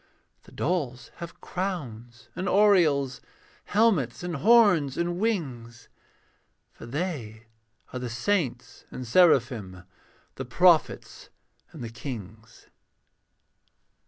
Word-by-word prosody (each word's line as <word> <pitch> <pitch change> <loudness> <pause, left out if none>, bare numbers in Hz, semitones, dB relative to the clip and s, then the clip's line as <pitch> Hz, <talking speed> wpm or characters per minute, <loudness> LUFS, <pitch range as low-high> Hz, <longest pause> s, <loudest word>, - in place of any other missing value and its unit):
The - - -17
dolls 145 -8 -3
have 170 -1 -9
crowns 120 - -6
and 185 +2 -3
aureoles, 160 -11 +3 0.4
Helmets 195 - +1
and 175 -3 -3
horns 190 - +4
and 175 +1 -1
wings. 130 - -3 0.8
For - - -12
they 120 - -5 0.5
are 125 - -4
the 125 -1 -5
saints 120 - -2
and 130 - -7
seraphim, 115 - +2 0.5
The - - -5
prophets - - +2 0.4
and 150 - -9
the 115 - -5
kings. 110 -2 -9
140 Hz, 100 wpm, -26 LUFS, 120-180 Hz, 0.8 s, horns